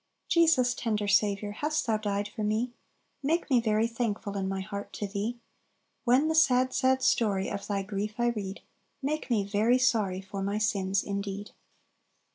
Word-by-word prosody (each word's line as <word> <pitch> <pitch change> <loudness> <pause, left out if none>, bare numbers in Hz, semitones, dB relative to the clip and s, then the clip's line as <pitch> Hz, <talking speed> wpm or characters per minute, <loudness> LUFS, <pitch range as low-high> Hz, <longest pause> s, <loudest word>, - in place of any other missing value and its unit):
"Jesus, 315 -8 +4
tender 215 -4 -1
Saviour, 205 0 +2
Hast 300 +8 -1
Thou 225 -3 +1
died 205 -1 -2
for 215 - -6
me? 220 +4 0 0.5
Make 310 +2 0
me 245 -2 +5
very 220 0 +2
thankful 225 -3 -2
In 190 -1 -1
my 195 0 -2
heart 200 +1 -6
to 205 - -3
Thee; 205 +4 -3 0.7
When 255 +6 +4
the 320 - +1
sad, 255 -5 +4
sad 260 0 +2
story 205 -6 +2
Of 200 -1 -5
Thy 200 -1 -1
grief 210 +1 -4
I 240 0 +2
read, 200 -4 -4 0.4
Make 305 +2 -2
me 220 -4 +2
very 215 +5 +2
sorry 220 -7 +1
For 195 +1 -6
my 200 +2 -1
sins 195 -3 +1
indeed." 200 0 -4
215 Hz, 170 wpm, -29 LUFS, 200-245 Hz, 0.7 s, me